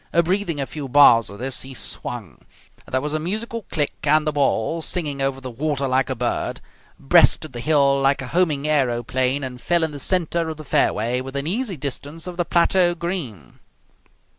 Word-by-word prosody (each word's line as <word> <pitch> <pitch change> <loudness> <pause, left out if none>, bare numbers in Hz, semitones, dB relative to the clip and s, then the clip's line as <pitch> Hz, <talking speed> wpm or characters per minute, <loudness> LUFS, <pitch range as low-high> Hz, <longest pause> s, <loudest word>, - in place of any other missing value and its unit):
Breathing 180 -3 -1
a 135 - -1
few 140 +1 -7
bars 120 -4 +6
of 100 - -10
this, 130 +2 -2
he 135 0 -8
swung. - - -5 0.5
There 130 - -1
was 150 +1 -3
a 155 - 0
musical 220 +6 -4
click, 150 -3 -1
and 155 +1 +3
the 155 - +1
ball, 145 +1 0
singing 150 -5 -2
over 135 0 -1
the 130 -1 -7
water 140 +2 -1
like 130 +1 +1
a 130 - -1
bird, 120 0 -2 0.4
breasted 70 - +4
the 120 - -5
hill 140 0 +3
like 135 0 +2
a - - -6
homing 155 -5 +1
aeroplane 130 -1 +1
and 125 -2 -6
fell 170 +3 +1
in 160 - -1
the 145 - -8
centre 170 -1 0
of 160 - -6
the 155 - -10
fairway 120 +1 +1
within 135 +2 -4
easy 200 +2 -2
distance 145 +3 -5
of 180 -1 -6
the 175 0 -1
plateau 175 +1 +3
green. 155 - -5
145 Hz, 190 wpm, -22 LUFS, 130-165 Hz, 0.5 s, bars